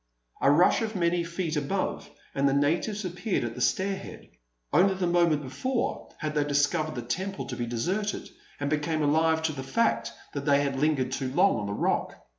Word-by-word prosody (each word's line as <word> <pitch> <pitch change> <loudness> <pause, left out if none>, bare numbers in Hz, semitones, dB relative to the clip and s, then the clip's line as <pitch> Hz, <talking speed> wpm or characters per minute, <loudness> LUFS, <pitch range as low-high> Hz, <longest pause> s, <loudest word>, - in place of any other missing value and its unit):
A - - +5
rush 165 +10 +5
of 220 -1 -3
many 170 -1 +1
feet 170 -1 -3
above, 150 +7 -2 0.2
and 140 0 +2
the 135 - +1
natives 175 +9 +1
appeared 185 - -1
at 120 -1 -3
the 125 - -7
stair 195 +9 +1
head. - - -10 0.4
Only 190 +1 +5
the 185 -1 -1
moment 170 -4 +3
before 235 - -2
had 155 -1 -3
they 150 -1 +2
discovered 145 +2 +1
the 120 - -4
temple 190 +11 -3
to 125 - -5
be 120 -1 -3
deserted, 185 - -2 0.3
and 145 - -1
become 155 +1 0
alive 160 +2 +3
to 160 - +1
the 135 - -5
fact 130 - 0 0.2
that 140 -1 -4
they 140 -1 +4
had 135 -1 -1
lingered 140 -4 +1
too 130 -1 -2
long 185 +7 +4
on 105 - -3
the 100 - -3
Rock. - - 0
155 Hz, 200 wpm, -28 LUFS, 140-180 Hz, 0.4 s, A